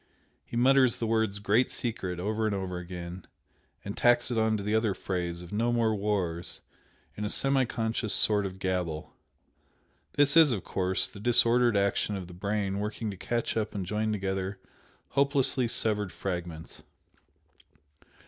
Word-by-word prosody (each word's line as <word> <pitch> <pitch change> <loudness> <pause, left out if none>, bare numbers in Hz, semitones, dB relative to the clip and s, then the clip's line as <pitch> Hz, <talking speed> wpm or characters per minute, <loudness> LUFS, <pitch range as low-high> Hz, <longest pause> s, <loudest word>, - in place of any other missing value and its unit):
He 115 - -6
mutters 130 0 +4
the 115 - -2
words 110 -2 +1
'Great 105 +5 +2
Secret' 95 -7 -4
over 110 +4 -1
and 105 - -1
over 95 -2 -3
again, 90 0 -8 0.6
and 100 - -4
tacks 120 +1 +3
it 120 - -1
on 110 0 +2
to 100 - -5
the 105 +1 -1
other 110 -3 +2
phrase 90 -2 -3
of 90 - -11
'No 115 +3 +1
more 115 -2 +2
wars' 100 -5 -2 0.6
in 105 - -5
a 105 - -1
semi 135 +2 +2
conscious 115 -1 -2
sort 105 0 +2
of 95 0 -9
gabble, 90 -4 -3 1.0
this 145 +1 +4
is, 160 -4 +7
of 105 -6 -2
course, 95 0 0
the 100 - -12
disordered 120 0 +4
action 100 +1 +1
of 95 -3 -6
the 90 - -11
brain 100 +1 -2
working 105 +1 -3
to - - -7
catch 115 +5 -2
up 110 -2 -2
and 95 -2 -2
join 110 +3 -1
together 95 -1 -2 0.5
hopelessly 140 -2 +2
severed 105 -4 0
fragments." 85 -3 -5
105 Hz, 160 wpm, -29 LUFS, 95-115 Hz, 1.0 s, is